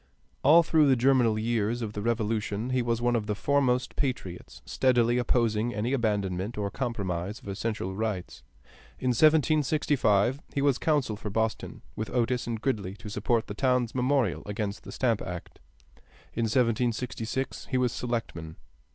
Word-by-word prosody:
All 160 Hz, +5 st, +7 dB
through 155 Hz, -2 st, +4 dB
the 135 Hz, -, +5 dB
germinal 125 Hz, -3 st, +3 dB
years 115 Hz, +1 st, 0 dB
of 105 Hz, -2 st, -4 dB
the 105 Hz, -, -4 dB
Revolution 110 Hz, 0 st, -1 dB
he 130 Hz, 0 st, +2 dB
was 120 Hz, 0 st, -1 dB
one 120 Hz, 0 st, +2 dB
of 110 Hz, -2 st, -1 dB
the 105 Hz, -, -1 dB
foremost 130 Hz, 0 st, +1 dB
patriots, 120 Hz, -10 st, -4 dB
steadily 120 Hz, -2 st, +2 dB
opposing 115 Hz, -1 st, +1 dB
any 115 Hz, +5 st, -1 dB
abandonment 105 Hz, -4 st, -1 dB
or 100 Hz, -1 st, -2 dB
compromise 100 Hz, -6 st, -3 dB
of -, -, -15 dB
essential 100 Hz, -1 st, -3 dB
rights. 105 Hz, -3 st, -4 dB, 0.6 s
In 130 Hz, -, -1 dB
1765 145 Hz, -5 st, +3 dB, 0.2 s
he 140 Hz, -, +1 dB
was 140 Hz, -3 st, +2 dB
counsel 145 Hz, -8 st, +1 dB
for 105 Hz, 0 st, -6 dB
Boston 110 Hz, +2 st, -2 dB
with 110 Hz, -, -4 dB
Otis 125 Hz, 0 st, 0 dB
and 115 Hz, -2 st, -2 dB
Gridley 105 Hz, -7 st, -2 dB
to 105 Hz, +1 st, -9 dB
support 110 Hz, +2 st, 0 dB
the -, -, -6 dB
town's 125 Hz, -1 st, +1 dB
memorial 125 Hz, -, +1 dB
against 105 Hz, 0 st, -4 dB
the -, -, -8 dB
Stamp 115 Hz, -5 st, 0 dB
Act. 90 Hz, -1 st, -7 dB, 0.7 s
In 115 Hz, -, 0 dB
1766 120 Hz, +1 st, -1 dB
he 130 Hz, -, +1 dB
was 125 Hz, -2 st, +2 dB
selectman. 115 Hz, -10 st, -4 dB
115 Hz, 155 wpm, -28 LUFS, 105-125 Hz, 0.7 s, All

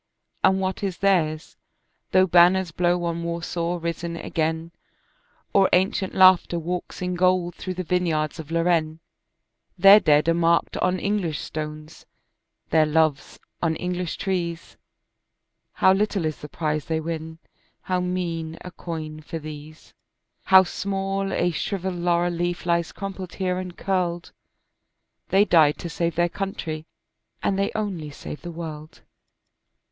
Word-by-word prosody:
And 190 Hz, 0 st, +4 dB
what 190 Hz, -1 st, -2 dB
is 195 Hz, -3 st, -2 dB
theirs, 165 Hz, -6 st, 0 dB, 0.5 s
though 185 Hz, 0 st, +5 dB
banners 180 Hz, 0 st, +4 dB
blow 175 Hz, +1 st, +1 dB
on 170 Hz, 0 st, -2 dB
Warsaw 170 Hz, +1 st, -2 dB
risen 170 Hz, 0 st, -4 dB
again, 160 Hz, 0 st, -2 dB, 0.8 s
Or 195 Hz, -1 st, +5 dB
ancient 190 Hz, +1 st, +1 dB
laughter 185 Hz, -2 st, +6 dB
walks 175 Hz, +2 st, -4 dB
in 180 Hz, 0 st, -1 dB
gold 180 Hz, -1 st, +2 dB
through 185 Hz, -1 st, -6 dB
the 185 Hz, -, -3 dB
vineyards 165 Hz, -4 st, 0 dB
of 160 Hz, -1 st, -8 dB
Lorraine, 165 Hz, -1 st, +1 dB, 0.8 s
Their 195 Hz, +3 st, +9 dB
dead 150 Hz, -4 st, +3 dB
are 165 Hz, -, +4 dB
marked 170 Hz, 0 st, +2 dB
on 185 Hz, 0 st, +1 dB
English 185 Hz, -6 st, -1 dB
stones, 155 Hz, 0 st, -7 dB, 0.6 s
their 155 Hz, -1 st, +4 dB
loves 155 Hz, -2 st, +1 dB, 0.2 s
on 165 Hz, -2 st, +1 dB
English 180 Hz, -1 st, -3 dB
trees, 170 Hz, -3 st, -3 dB, 1.0 s
How 190 Hz, -, +4 dB
little 200 Hz, -3 st, 0 dB
is 155 Hz, -1 st, -2 dB
the 150 Hz, -, -10 dB
prize 155 Hz, -1 st, -2 dB
they 160 Hz, -1 st, -1 dB
win, 160 Hz, 0 st, -5 dB, 0.4 s
how 185 Hz, -1 st, -1 dB
mean 170 Hz, -3 st, -3 dB
a 180 Hz, -, -8 dB
coin 160 Hz, -3 st, -6 dB
for 160 Hz, +2 st, -6 dB
these— 155 Hz, 0 st, -10 dB, 0.5 s
How 190 Hz, 0 st, +8 dB
small 195 Hz, +1 st, -2 dB
a 175 Hz, -, +1 dB
shrivelled 190 Hz, +2 st, -3 dB
laurel 175 Hz, 0 st, +1 dB
leaf 175 Hz, +1 st, -2 dB
lies 170 Hz, -1 st, +1 dB
crumpled 190 Hz, -2 st, -7 dB
here 185 Hz, -1 st, -1 dB
and 180 Hz, -1 st, -7 dB
curled: 175 Hz, -3 st, -1 dB, 1.0 s
They 195 Hz, +2 st, +4 dB
died 155 Hz, -6 st, +4 dB
to 170 Hz, -, -6 dB
save 170 Hz, -1 st, -2 dB
their 175 Hz, +1 st, +3 dB
country 165 Hz, -4 st, -5 dB, 0.6 s
and 195 Hz, -1 st, +1 dB
they 200 Hz, -, +1 dB
only 190 Hz, -8 st, -3 dB
saved 145 Hz, +1 st, -8 dB
the 175 Hz, -, -7 dB
world. 160 Hz, -2 st, -8 dB
175 Hz, 140 wpm, -24 LUFS, 160-185 Hz, 1.0 s, Their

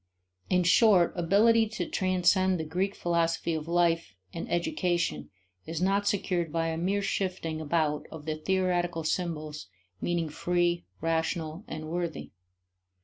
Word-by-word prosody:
In 180 Hz, -1 st, +3 dB
short, 185 Hz, 0 st, +5 dB
ability 220 Hz, +6 st, +4 dB
to 210 Hz, -5 st, -4 dB
transcend 185 Hz, 0 st, +2 dB
the -, -, -1 dB
Greek 185 Hz, +5 st, -1 dB
philosophy 170 Hz, -1 st, 0 dB
of 160 Hz, 0 st, -4 dB
life 170 Hz, -, +1 dB, 0.2 s
and 165 Hz, -, -6 dB
education 175 Hz, -, 0 dB, 0.4 s
is 165 Hz, -1 st, -3 dB
not 195 Hz, +2 st, +1 dB
secured 180 Hz, -5 st, 0 dB
by 165 Hz, 0 st, 0 dB
a 160 Hz, -, -2 dB
mere 200 Hz, +4 st, 0 dB
shifting 180 Hz, -5 st, -2 dB
about 155 Hz, -1 st, 0 dB
of 155 Hz, -2 st, -9 dB
the 155 Hz, -, -1 dB
theoretical 175 Hz, 0 st, 0 dB
symbols 155 Hz, -, -3 dB, 0.3 s
meaning 170 Hz, -2 st, 0 dB
free, 175 Hz, +2 st, 0 dB, 0.2 s
rational, 160 Hz, +1 st, -1 dB
and 155 Hz, 0 st, -6 dB
worthy. 170 Hz, 0 st, -4 dB
170 Hz, 135 wpm, -28 LUFS, 160-185 Hz, 0.4 s, short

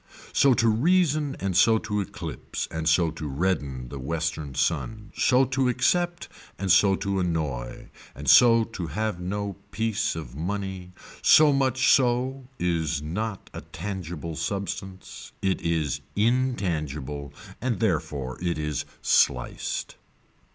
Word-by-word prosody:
So 135 Hz, -3 st, +5 dB
to 115 Hz, 0 st, +2 dB
reason 150 Hz, +3 st, +2 dB
and 95 Hz, -2 st, -2 dB
so 110 Hz, +4 st, +5 dB
to 105 Hz, -1 st, -2 dB
eclipse 95 Hz, -, -5 dB
and 80 Hz, 0 st, -1 dB
so 80 Hz, 0 st, +3 dB
to 80 Hz, -1 st, -6 dB
redden 70 Hz, -5 st, -2 dB
the 70 Hz, -, -7 dB
western 80 Hz, 0 st, -3 dB
sun, 105 Hz, -, -1 dB
so 130 Hz, +1 st, +4 dB
to 130 Hz, 0 st, +1 dB
accept 175 Hz, +8 st, +1 dB, 0.3 s
and 95 Hz, -1 st, 0 dB
so 95 Hz, +1 st, +5 dB
to 100 Hz, 0 st, -2 dB
annoy 75 Hz, -9 st, -3 dB, 0.3 s
and -, -, -8 dB
so 115 Hz, -2 st, +7 dB
to 100 Hz, -7 st, -6 dB
have 105 Hz, +4 st, -2 dB
no 100 Hz, +2 st, -3 dB
piece 110 Hz, -2 st, -1 dB
of 65 Hz, -7 st, -7 dB
money, 95 Hz, +2 st, -4 dB, 0.3 s
so 150 Hz, -2 st, +7 dB
much 130 Hz, -1 st, +3 dB
so 130 Hz, +1 st, +1 dB
is 80 Hz, -4 st, -1 dB
not 100 Hz, +6 st, -4 dB
a -, -, -6 dB
tangible 85 Hz, -3 st, -6 dB
substance, 95 Hz, +2 st, -5 dB
it 95 Hz, -1 st, +1 dB
is 80 Hz, -5 st, -1 dB
intangible 80 Hz, -, -1 dB, 0.3 s
and 120 Hz, -5 st, -1 dB
therefore 75 Hz, -, -1 dB
it 85 Hz, -2 st, -1 dB
is 75 Hz, -2 st, -2 dB, 0.2 s
sliced. -, -, +1 dB
95 Hz, 130 wpm, -26 LUFS, 80-115 Hz, 0.3 s, so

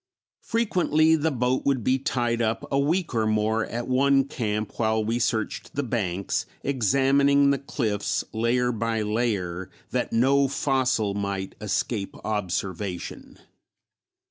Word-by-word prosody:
Frequently 175 Hz, -8 st, +2 dB
the 160 Hz, +1 st, +1 dB
boat 125 Hz, -2 st, 0 dB
would 135 Hz, -4 st, +1 dB
be 130 Hz, +3 st, +2 dB
tied 120 Hz, -3 st, 0 dB
up 110 Hz, 0 st, -1 dB
a 135 Hz, -, +2 dB
week 165 Hz, +4 st, 0 dB
or 110 Hz, -2 st, +1 dB
more 110 Hz, +1 st, +1 dB
at 120 Hz, +1 st, -4 dB
one 135 Hz, +1 st, +4 dB
camp 110 Hz, -5 st, -3 dB
while 110 Hz, -1 st, +2 dB
we 115 Hz, +2 st, 0 dB
searched 110 Hz, -2 st, -2 dB
the 145 Hz, -, 0 dB
banks, 100 Hz, -7 st, -2 dB, 0.2 s
examining 140 Hz, +3 st, +3 dB
the 140 Hz, -, 0 dB
cliffs 110 Hz, -7 st, -1 dB
layer 120 Hz, +2 st, +1 dB
by 115 Hz, -1 st, -1 dB
layer 100 Hz, -5 st, -1 dB, 0.2 s
that -, -, -1 dB
no 135 Hz, +4 st, +3 dB
fossil 130 Hz, -6 st, +1 dB
might 100 Hz, -1 st, -3 dB
escape 100 Hz, 0 st, -2 dB
observation. 95 Hz, -3 st, -4 dB
120 Hz, 130 wpm, -25 LUFS, 105-135 Hz, 0.2 s, one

